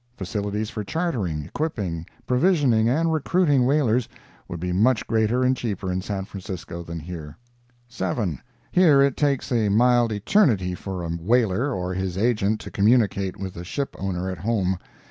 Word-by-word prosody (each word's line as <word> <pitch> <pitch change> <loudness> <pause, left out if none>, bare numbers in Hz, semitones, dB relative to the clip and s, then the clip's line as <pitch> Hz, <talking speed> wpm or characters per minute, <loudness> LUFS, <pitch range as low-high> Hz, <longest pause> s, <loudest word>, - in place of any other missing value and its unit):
Facilities 105 +2 -3
for 105 - -4
chartering, 105 - -2
equipping, 95 - -3 0.2
provisioning 125 -6 +3
and 160 +5 +1
recruiting 150 -4 +2
whalers 130 -4 +2 0.4
would 85 - -6
be 90 +2 -2
much 110 +4 +3
greater 115 +3 +1
and 130 +1 +3
cheaper 100 -6 -3
in 90 +1 -1
San 95 0 -4
Francisco 90 -4 -7
than 85 0 -6
here. 80 -2 -8 0.5
7. 95 - -2 0.3
Here 155 -7 +6
it 140 -2 +2
takes 140 -3 0
a 110 -4 +2
mild 120 +2 +4
eternity 105 - +2
for 90 0 -5
a 85 - -4
whaler 110 - +1
or 90 -5 -3
his 95 -1 -3
agent 110 -1 +1
to - - -9
communicate 100 -3 +2
with 95 -1 -5
the 85 - -7
ship 140 +10 -4
owner 95 -1 -2
at 95 -3 -4
home. 95 -2 0
105 Hz, 160 wpm, -24 LUFS, 90-125 Hz, 0.5 s, Here